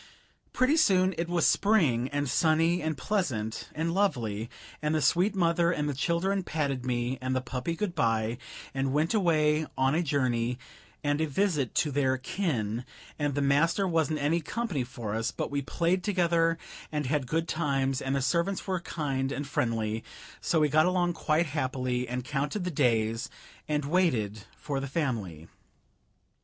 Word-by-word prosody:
Pretty 260 +5 +3
soon 190 - +4
it 170 0 -2
was 175 -1 +2
spring, 150 - +3
and 145 0 -1
sunny 165 +5 +2
and 155 -1 -2
pleasant 125 - -2
and 165 +2 -1
lovely, 120 - 0 0.3
and 150 +1 0
the - - +2
sweet 180 +9 +3
mother 170 -1 +3
and 150 -3 -1
the 145 - -1
children 175 +7 0
patted 140 -7 -2
me 120 +1 -1
and 130 0 -1
the - - +2
puppy 130 +5 -3
good 190 0 -2
by, 115 -5 0 0.3
and 135 0 -1
went 155 +6 +1
away 155 -6 +2
on 130 +1 +3
a 165 - +2
journey 125 -6 0 0.5
and 145 +1 +1
a 160 - +1
visit 150 - 0
to 150 - +2
their 130 -1 +1
kin, 125 - -2 0.4
and 145 -2 0
the 145 - +1
master 165 +8 +3
wasn't 160 -3 +1
any 150 +4 +1
company 180 - -2
for 120 -4 -6
us, 115 +2 0
but - - -4
we 140 0 0
played 175 +6 0
together 170 -4 +2 0.3
and 150 -1 -1
had 140 -1 0
good 165 +5 0
times, 135 -4 0
and 135 +1 -1
the 135 - 0
servants 175 +6 0
were 185 -2 -1
kind 135 -5 -2
and 145 +1 -3
friendly, 115 -5 -1 0.4
so 165 - +1
we 150 - +4
got 155 +4 +4
along 180 -1 +1
quite 160 +1 +1
happily 130 -4 -2
and 125 0 -4
counted 150 +7 -2
the 180 - -2
days 115 -5 +1 0.4
and 150 -1 0
waited 120 - +1
for 140 -2 -3
the 140 - -4
family. 110 - -3
145 Hz, 170 wpm, -29 LUFS, 130-170 Hz, 0.5 s, soon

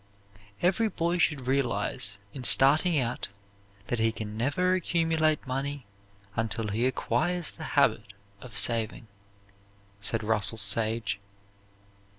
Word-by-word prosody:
"Every 195 +6 +2
boy 175 -3 -1
should 150 -6 +1
realize, 115 -6 -1 0.2
in 130 - -7
starting 150 +7 +6
out, 125 -2 -1 0.6
that 120 - -2
he 115 0 +2
can 105 -1 -7
never 145 +11 +1
accumulate 165 -4 +1
money 135 +1 -4 0.5
unless 110 -1 -2
he 120 +4 +1
acquires 175 +5 -1
the - - -10
habit 100 - +2 0.3
of 115 -5 -9
saving," 115 +2 +2 0.9
said 110 +2 -2
Russell 110 0 0
Sage. 110 0 -1
125 Hz, 115 wpm, -28 LUFS, 110-155 Hz, 0.9 s, starting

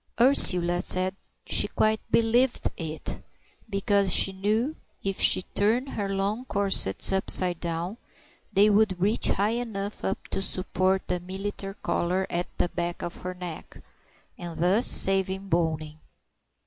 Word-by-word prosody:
Ursula 180 -9 +6
said 185 +1 +3 0.3
she - - 0
quite 215 0 -1
believed 235 +3 +1
it, 160 -1 -6 0.5
because 200 -1 0
she 195 - +5
knew, 215 +10 -2 0.3
if 195 -1 -4
she 185 - +3
turned 230 +9 -1
her 205 -6 -5
long 200 +4 -3
corsets 195 - +3
upside 185 -2 +4
down, 170 +5 -5 0.5
they 200 +2 +3
would 205 -3 +1
reach 205 +5 -1
high 205 +3 -1
enough 205 -3 -7
up 195 - -5
to - - -4
support 190 0 -2
the 180 - -3
military 195 +2 -7
collar 180 +2 -2
at 175 +1 -3
the 175 - -1
back 175 0 -5
of 175 - -7
her 185 0 -8
neck, 180 -3 -10 0.6
and 175 -2 -9
thus 185 +7 +1
save 195 -1 +5 0.2
boning. 155 -2 -3
190 Hz, 135 wpm, -25 LUFS, 175-205 Hz, 0.6 s, Ursula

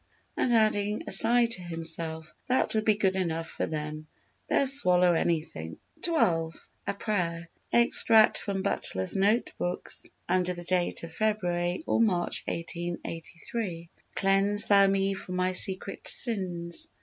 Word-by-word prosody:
And 250 - -1
adding 215 -2 0
aside 235 +1 +5
to 185 - -4
himself: 165 -2 -4
"That 255 +1 0
will 220 - 0
be 215 -1 +1
good 190 -2 -1
enough 165 -3 -3
for - - -5
them; 155 0 -7 0.4
they'll - - +1
swallow 180 -10 +6
anything." 155 - -4 0.3
xii. 340 -1 -2 0.7
A - - -2
Prayer 170 -6 -4 0.2
Extract 230 -2 +4
from 195 -2 -5
Butler's 95 - -2
Note 205 +5 0
Books 175 0 -5 0.2
under 180 0 -1
the 175 - -8
date 175 -1 -2
of 165 -1 -10
February 180 - -3
or - - -1
March 180 -6 0
1883: 170 +2 -7 0.3
"'Cleanse 200 +2 +4
thou 200 -2 +4
me 195 0 -1
from 185 -1 -8
my 185 0 -1
secret 190 +1 +3
sins. 175 -6 +2
185 Hz, 135 wpm, -26 LUFS, 170-210 Hz, 0.7 s, swallow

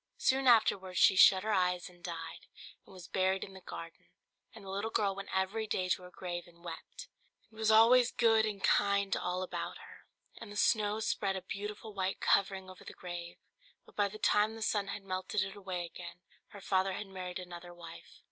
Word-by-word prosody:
Soon 265 0 +2
afterwards 195 -6 +4
she 190 - +6
shut 190 0 +7
her 215 0 0
eyes 180 -2 +1
and 175 -1 -18
died, 165 -2 -7 0.4
and - - -16
was 180 -2 -11
buried 190 0 +1
in 195 - -9
the 190 - -12
garden; 165 -2 -9 0.4
and 220 -4 -13
the - - -8
little 200 +3 -2
girl 200 -3 +1
went 200 +1 -8
every 190 +4 -1
day 185 -3 -1
to 180 - +1
her 180 - -11
grave 175 -1 -6
and 170 0 -20
wept, 175 - -8 0.4
and 220 - -15
was 220 -1 +2
always 235 +3 +7
good 225 -2 +4
and 210 -2 -3
kind 200 -1 +3
to - - 0
all 180 +1 -2
about 185 - -5
her. - - -15 0.3
And 220 -3 -9
the - - -9
snow 210 0 +2
spread 195 -3 0
a 190 - -4
beautiful 210 +2 -6
white 190 -1 -2
covering 190 -1 +2
over 185 0 -12
the - - -9
grave: 175 -1 -7 0.5
but - - -20
by 205 -1 +2
the 205 +2 -9
time 215 +1 +2
the 225 - -5
sun 205 -2 0
had 200 0 -5
melted 185 0 -1
it 195 0 -6
away 185 -3 -4
again, 175 +1 -9 0.3
her 200 - -12
father 190 0 +1
had 210 - -5
married 185 -2 -6
another 175 -1 -9
wife. 170 -1 -12
190 Hz, 210 wpm, -32 LUFS, 180-210 Hz, 0.5 s, shut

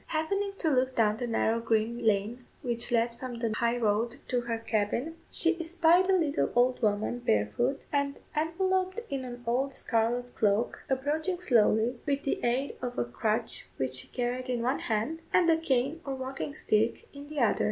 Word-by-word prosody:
Happening 395 +6 -1
to 330 - -2
look 260 -1 +1
down 215 -2 +3
the 245 - -3
narrow 230 0 +1
green 230 +1 0
lane 220 +3 +1 0.2
which 235 -1 -2
led 235 0 +1
from 255 -2 -5
the 230 -2 -1
high 235 +1 +1
road 230 +1 +1
to 250 -1 +1
her 235 -1 -2
cabin, 225 +7 -1
she 340 0 +1
espied 345 +2 +3
a 385 - +5
little 310 -4 +1
old 250 +1 +3
woman 215 +2 0
barefoot, 240 - 0
and 280 -1 0 0.2
enveloped 370 +5 0
in 270 -1 -2
an 245 -1 -8
old 260 +4 0
scarlet 240 +2 0
cloak, 210 +2 +1
approaching 305 +7 0
slowly, 235 -5 +3
with 280 0 0
the 275 - -2
aid 250 +4 0
of 245 -1 -4
a - - +1
crutch 215 - 0
which 130 -1 -1
she 130 - +1
carried 250 +1 -3
in 240 -2 -1
one 255 +3 +1
hand, 225 +9 -1
and 360 -2 +4
a 320 - +4
cane 280 0 0
or 275 -1 -3
walking 265 +2 -5
stick 220 -4 0
in 285 0 -10
the 305 -1 -4
other. 235 -4 +3
245 Hz, 185 wpm, -29 LUFS, 230-290 Hz, 0.2 s, a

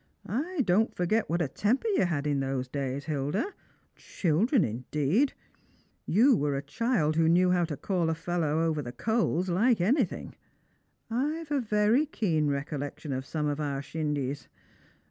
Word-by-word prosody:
I 310 - -2
don't 215 0 +2
forget 200 +5 0
what 170 +1 +1
a - - -1
temper 220 - 0
you 390 - +2
had 155 -5 -1
in 145 -2 +1
those 135 -1 -2
days, 135 +1 -3
Hilda. 155 - -2 0.4
Children 195 - +1
indeed! 145 - 0 0.7
You 245 - +5
were 145 -6 0
a 135 - -3
child 225 -11 0
who 165 -1 +4
knew 180 +2 +4
how 175 -1 +2
to 155 -3 -5
call 175 -2 0
a 160 - 0
fellow 165 -2 -1
over 160 -2 0
the 120 -3 -6
coals 210 - 0
like 215 +6 +3
anything, 220 - 0 0.8
['ve 300 +6 -2
a - - +2
very 215 +6 +2
keen 165 - 0
recollection 145 0 -3
of 130 +1 -4
some 155 -2 -2
of 145 0 -1
our 140 -2 -2
shindies. 145 -3 -3
165 Hz, 160 wpm, -28 LUFS, 145-220 Hz, 0.8 s, You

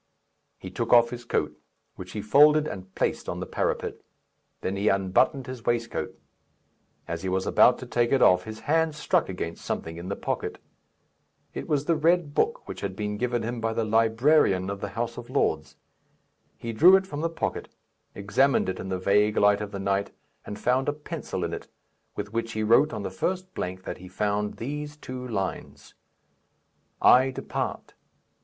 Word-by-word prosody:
He 95 - -9
took 115 +5 -3
off 120 -1 +6
his 120 -1 -7
coat, 75 -9 -1 0.4
which 90 0 -9
he 105 - -4
folded 150 +6 +5
and 95 0 -8
placed - - -1
on - - -4
the - - -4
parapet; - - -2 0.6
then 95 - -2
he 100 +2 -1
unbuttoned 100 +8 +2
his 130 -2 -8
waistcoat. 120 -1 -2 0.9
As 85 -1 -4
he 95 - -3
was 95 0 0
about 125 - +5
to - - -8
take 120 -1 0
it 135 - +4
off, 90 0 +5
his 110 0 -8
hand 160 +1 +1
struck 150 - +1
against 85 -3 -5
something 80 0 -4
in 85 +2 -7
the 100 - -2
pocket. - - -3 1.0
It - - -6
was 145 -1 0
the 165 - +2
red 160 -1 +2
book 465 - 0
which - - -7
had 95 -2 -4
been 105 0 -3
given 120 0 -1
him 120 +1 -4
by 115 0 0
the 115 - 0
librarian 110 -2 +3
of 100 0 -6
the 100 - -3
House 115 0 -2
of 120 0 -8
Lords: 80 - 0 0.8
he 115 -1 -5
drew 175 +12 +8
it 190 0 +2
from 150 -5 -5
the 165 - 0
pocket, 165 - -3 0.5
examined 100 +4 +2
it 95 - -4
in 95 - -6
the 95 - -1
vague 105 +3 +2
light 100 0 +4
of 105 - -4
the 100 - -6
night, 100 +1 -1 0.4
and 105 - -6
found 130 +5 +1
a - - 0
pencil 150 - -5
in 85 0 -3
it, - - -6 0.5
with 105 +1 -5
which 115 0 -2
he 110 - -1
wrote 120 +8 +4
on 100 - -5
the 95 - -4
first 185 - -3
blank 95 +1 -5
that - - -6
he 90 - -11
found 105 +2 -1
these 150 +4 -5
two 130 -3 -7
lines, 95 -5 -5 1.1
"I 130 +2 +7
depart. 130 - -4
115 Hz, 190 wpm, -26 LUFS, 100-135 Hz, 1.1 s, drew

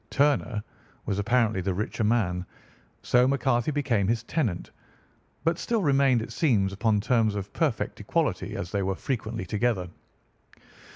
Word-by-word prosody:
Turner 135 -7 +1 0.4
was 100 - -1
apparently 110 -2 +2
the 95 0 -1
richer 110 +3 -2
man, 105 -5 +1 0.6
so 125 +1 +4
McCarthy 130 -2 +1
became 130 -9 +1
his 115 +1 0
tenant 115 - -2 0.7
but 165 +1 +1
still 230 -4 0
remained, 135 -5 +3
it 115 - -8
seems, 105 -10 +2
upon 105 +1 +1
terms 110 -1 +2
of 100 0 -5
perfect 150 -9 -1
equality, - - -1
as 90 - -5
they 100 - 0
were 95 0 -1
frequently 115 -3 -3
together. 100 -2 0
115 Hz, 140 wpm, -27 LUFS, 100-130 Hz, 0.7 s, so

